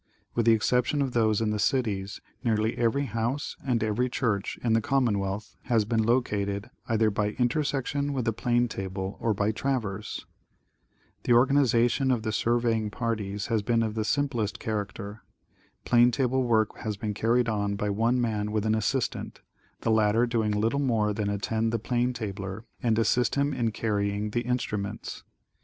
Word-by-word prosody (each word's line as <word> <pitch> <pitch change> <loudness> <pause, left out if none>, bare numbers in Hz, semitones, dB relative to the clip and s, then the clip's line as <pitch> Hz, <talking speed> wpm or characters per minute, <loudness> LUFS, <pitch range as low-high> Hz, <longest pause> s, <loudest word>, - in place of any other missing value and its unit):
With 115 -1 0
the 115 - +8
exception 125 +5 +1
of 130 -2 -3
those 110 -2 +2
in 110 -1 +1
the 105 - -1
cities, 105 -5 0 0.2
nearly 110 -1 +1
every 120 +4 +1
house 115 +5 -2
and 120 -4 0
every 110 +4 0
church 105 -6 -1
in 115 -2 +2
the 115 - +3
commonwealth 105 -6 0
has 115 -4 +2
been 110 +1 +1
located, 105 -3 0 0.2
either 110 -1 +3
by 105 +1 -1
intersection 140 +2 0
with 130 -4 -2
the 115 - +1
plane 120 +2 +1
table 95 -2 -5
or 110 -2 0
by 105 +2 +1
traverse. 110 -5 -3 1.0
The 120 - +4
organization 125 0 +3
of 120 -4 +1
the 110 - -1
surveying 115 -1 +1
parties 105 -3 -3
has 110 - +2
been 115 +2 +1
of 110 -1 -2
the 110 0 -1
sim 145 +6 +1
plest 110 -7 -2
character. 105 0 -4 0.6
Plane 120 0 +5
table 130 +1 +1
work 110 -3 +1
has 105 -2 -3
been 105 +1 -3
carried 115 +3 +2
on 105 -2 0
by 105 +1 -1
one 115 +5 +2
man 105 -3 -1
with 110 0 0
an 110 - +2
assistant, 110 +4 -1 0.4
the 115 - +1
latter 110 +2 +3
doing 115 -3 0
little 110 +6 +1
more 110 -6 +1
than 105 0 -1
attend 110 +3 -1
the 115 - +1
plane 120 +2 0
tabler 100 -3 -5 0.2
and 115 -4 +2
assist 115 +2 +2
him 140 +1 +1
in 120 -3 0
carrying 105 -1 -1
the 120 - 0
instruments. 110 -4 -3
115 Hz, 170 wpm, -27 LUFS, 105-120 Hz, 1.0 s, the